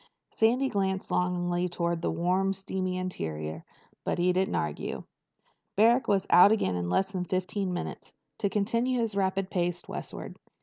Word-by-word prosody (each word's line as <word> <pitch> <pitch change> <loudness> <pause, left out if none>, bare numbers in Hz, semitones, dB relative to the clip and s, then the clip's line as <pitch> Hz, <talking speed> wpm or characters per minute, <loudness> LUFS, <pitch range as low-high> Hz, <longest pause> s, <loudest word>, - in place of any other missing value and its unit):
Sandy 245 +5 +3
glanced 190 -4 -1
longingly 180 0 0
toward 170 -1 -1
the - - 0
warm 185 +4 +1
steamy 190 -1 -3
interior, 80 - -4 0.4
but - - -1
he 180 +1 +3
didn't 190 +1 +1
argue. 75 -1 -3 0.7
Barrack 230 +5 +4
was 195 -1 +2
out 185 +4 +8
again 210 - +2
in 90 -1 -2
less 190 - +1
than 185 -2 -2
fifteen 185 +1 -1
minutes, 175 - -5 0.3
to 200 - +1
continue 230 +5 +1
his 225 -3 0
rapid 190 -1 0
pace 175 -1 -1
westward. - - -7
185 Hz, 155 wpm, -28 LUFS, 175-200 Hz, 0.7 s, out